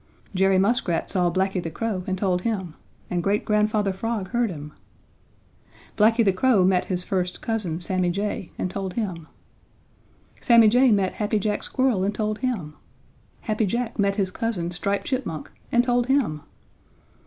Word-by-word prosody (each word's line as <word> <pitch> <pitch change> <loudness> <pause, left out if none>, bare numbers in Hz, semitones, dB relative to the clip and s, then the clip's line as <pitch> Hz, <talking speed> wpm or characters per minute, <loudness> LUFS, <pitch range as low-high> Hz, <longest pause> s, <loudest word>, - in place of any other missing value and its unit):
Jerry 190 0 +3
Muskrat 195 -3 +1
saw 180 -3 +2
Blacky 190 +1 0
the 165 - -4
Crow 195 +2 -3
and 190 -1 -1
told 185 -2 0
him, 190 -6 -2 0.4
and 175 -1 0
Great 200 +4 0
Grandfather 210 -1 +1
Frog 210 -1 -3
heard 240 -1 +1
him. 150 -3 -8 1.2
Blacky 225 +2 +4
the 195 - +4
Crow 200 -1 +3
met 185 -1 +2
his 180 -1 -3
first 180 -1 -2
cousin, 205 -8 -2
Sammy 185 0 0
Jay, 200 -1 -3
and 180 - -2
told 190 -2 -4
him. 180 -8 -3 1.1
Sammy 230 -2 +6
Jay 250 +2 +5
met 195 -3 +2
Happy 215 0 -1
Jack 210 0 -1
Squirrel 255 -8 +1
and 205 +2 -1
told 215 0 -2
him. 210 - -2 0.7
Happy 215 -1 0
Jack 235 +2 -2
met 200 0 +2
his 195 -2 0
cousin, 190 -6 -2
Striped 200 +3 -1
Chipmunk, 245 - -3 0.2
and 240 0 +4
told 245 -1 +1
him. 255 - +1
200 Hz, 160 wpm, -24 LUFS, 180-225 Hz, 1.2 s, Sammy